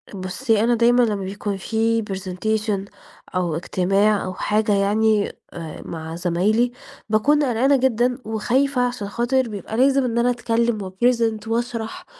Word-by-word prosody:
بُصّي 200 +5 0
أنا 240 +1 +3
دايمًا 240 +1 +4
لمّا 215 -3 +1
بيكون 200 +1 -4
في 225 +3 0
presentation 200 +1 -2 0.4
أو 175 -4 0
اجتماع 195 +4 +1
أو 185 - -4
حاجة 210 +3 0
يعني، 205 +1 +2 0.2
آآ، 165 -2 -7
مع 160 0 -6
زمايلي 190 +8 +1 0.4
باكون 285 +8 +3
قلقانة 265 +2 +3
جدًا 250 -1 +1
وخايفة 250 +5 0
عشان 245 -5 -5
خاطر 240 +2 0
بيبقى 210 +2 -6
لازم 270 +1 +4
إن 235 -1 -1
أنا 240 +1 +3
أتكلّم 230 -4 -1
وأpresent 225 +1 0
واشرح 230 -1 -3
220 Hz, 140 wpm, -22 LUFS, 195-240 Hz, 0.4 s, دايمًا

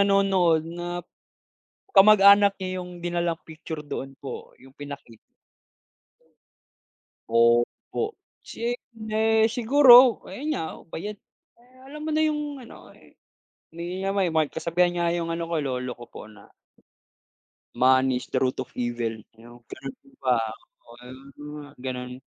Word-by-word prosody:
nanonood 195 -5 +3
na 175 +1 -6 0.9
kamag-anak 200 0 +7
niya 185 -1 -4
'yong 180 0 -9
dinalang 170 -1 -1
picture 160 -1 -8
doon 135 -2 -6
po, 140 - -8
'yong 130 0 -18
pinaki 140 -5 -10 2.1
Opo. 120 - +1 0.3
Chine 220 -2 -1
siguro, 245 +1 +7
ayun 300 +4 -5
nga, 275 - -2 0.3
bayad. 205 +7 -5 0.4
Eh, 250 +2 -25
alam 300 +2 -9
mo 315 - -3
na 310 0 +1
'yong 300 -2 -3
ano, - - -14
eh, - - -21 0.6
hindi 175 +3 -5
niya 195 - 0
may 195 -3 +1
may 160 -1 +2
kasabihan 175 +1 +1
nga 175 -1 0
'yong 170 -1 -2
ano 165 0 -4
ko, 170 - -1
lolo 130 -4 -3
ko 120 - -11
po, - - -12
na 105 -1 -16 1.3
"Money 130 0 +3
is 125 - -5
the - - -1
root 130 0 0
of 130 -1 -7
evil." 120 -2 -2 0.3
'Yon, 120 +1 -14
gano'n - - -8
po 275 - -23
ba, 125 -1 +2 0.6
ah, 140 +3 -11
gano'n. 125 -1 -5
170 Hz, 130 wpm, -25 LUFS, 135-215 Hz, 2.1 s, kamag-anak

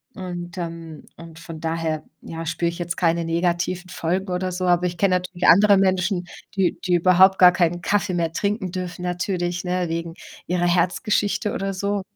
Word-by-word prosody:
Und, 175 -1 -7
ähm 165 -3 -7
und 165 -1 -12
von 165 -1 -9
daher 160 -1 -2 0.2
ja 165 0 -7
spüre 170 +1 0
ich 170 +1 -8
jetzt 175 +1 -3
keine 170 -1 +1
negativen 175 +2 -1
Folgen 180 +3 -2
oder 185 +1 -2
so. 180 +1 -3
Aber 175 0 +3
ich 175 - -6
kenne 185 0 +3
natürlich 180 0 -3
andere 200 +3 +7
Menschen, 185 -1 +1 0.3
die 190 -3 +1
die 180 -2 +3
überhaupt 185 +2 +5
gar 180 -1 +9
keinen 175 -1 0
Kaffee 205 -1 0
mehr 165 -2 0
trinken 200 +1 -2
dürfen 180 -1 -5
natürlich, 180 0 -2
ne, 180 -1 -1
wegen 165 0 -4 0.3
ihrer 175 0 0
Herzgeschichte 200 +4 +1
oder 195 0 -2
so. 200 +1 -1
180 Hz, 180 wpm, -22 LUFS, 170-185 Hz, 0.3 s, gar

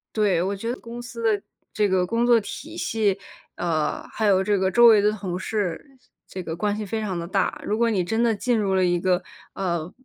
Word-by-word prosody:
对， 200 -6 +2
我 195 +2 -1
觉 230 +4 -4
得 255 - -6
公 235 0 -8
司 240 -1 -8
的 215 -3 +2 0.3
这 210 -1 +2
个 185 -1 +2
工 230 +5 0
作 240 -1 +5
体 315 +10 -8
系， 215 - 0 0.4
呃， 160 -3 -1
还 220 - -1
有 190 -1 +4
这 200 0 +1
个 190 - +2
周 235 +5 +5
围 220 -3 +8
的 210 +1 +3
同 190 -4 -4
事 210 - -3 0.3
这 185 - -6
个 165 -1 -4
关 205 +3 -1
系 215 - -4
非 220 +3 -3
常 195 -4 -3
地 170 0 -4
大。 190 +1 0
如 215 +2 -1
果 235 0 +3
你 195 -5 +1
真 225 +6 -1
的 235 -1 +3
进 240 +2 0
入 195 -2 +1
了 185 -1 +3
一 175 -1 +1
个， 180 0 +1 0.3
呃， 170 -3 -2
205 Hz, 250 characters per minute, -24 LUFS, 185-225 Hz, 0.4 s, 围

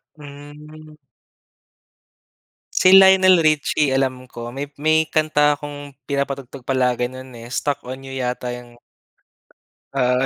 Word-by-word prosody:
Hmm. 150 +1 -13 1.8
Si 185 - +4
Lionel 190 -1 +7
Richie 150 -3 +1
alam 130 -1 -2
ko 120 -1 -8
may 140 +3 -5
may 155 +2 +1
kanta 150 -2 +2
'kong 145 -1 -9
pinapatugtog 140 -2 -5
palagay 125 -2 0
nun, 130 +1 -11
eh, 115 0 -11
"Stuck 140 +3 -2
on 130 +1 -8
You" 135 - -9
yata 125 -1 -3
yung 120 -1 -10 1.2
Oo, 125 -1 +1
140 Hz, 115 wpm, -20 LUFS, 125-150 Hz, 1.8 s, Lionel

